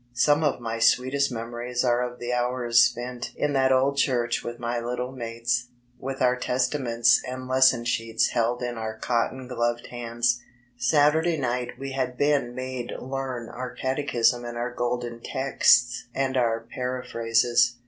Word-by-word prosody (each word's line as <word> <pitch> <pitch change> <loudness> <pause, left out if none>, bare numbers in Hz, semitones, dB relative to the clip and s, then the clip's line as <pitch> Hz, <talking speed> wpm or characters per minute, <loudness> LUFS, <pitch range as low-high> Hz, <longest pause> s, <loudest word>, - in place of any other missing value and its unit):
Some 145 +5 +3
of 145 -4 +1
my 115 -1 -4
sweetest 130 +4 +3
memories 120 +1 -3
are 120 0 +2
of 125 0 -4
the 120 0 -3
hours 120 -1 +2
spent 120 0 0
in 145 -1 0
tfiat 135 -1 +3
old 135 +2 +2
church 120 -4 +1
wi 120 - -5
A - - -24
my 120 0 -2
little 125 +2 -3
mates, 120 0 -2 0.3
with 135 0 -3
our 125 0 +4
testaments 125 -2 +2
and 130 0 -6
lesson 130 -2 +4
sheets 115 -1 +1
held 120 +1 0
in 120 -1 -3
our 110 0 -4
cotton 125 +2 -1
gloved 120 -1 -1
hands. 120 0 -1 0.3
Saturday 150 +6 +3
night 125 -2 -2
we 135 0 -6
had 130 -2 -2
been 140 -4 +1
made 130 -1 -5
learn 130 -2 -4
our 125 0 -6
catechism 130 -3 +1
and 120 0 -6
our 120 +1 -3
Golden 120 -1 -2
texts 120 -1 +2
and 135 -1 0
our 115 -3 +1
para 125 0 -3
phrases. 120 +1 +2
125 Hz, 160 wpm, -25 LUFS, 120-130 Hz, 0.3 s, our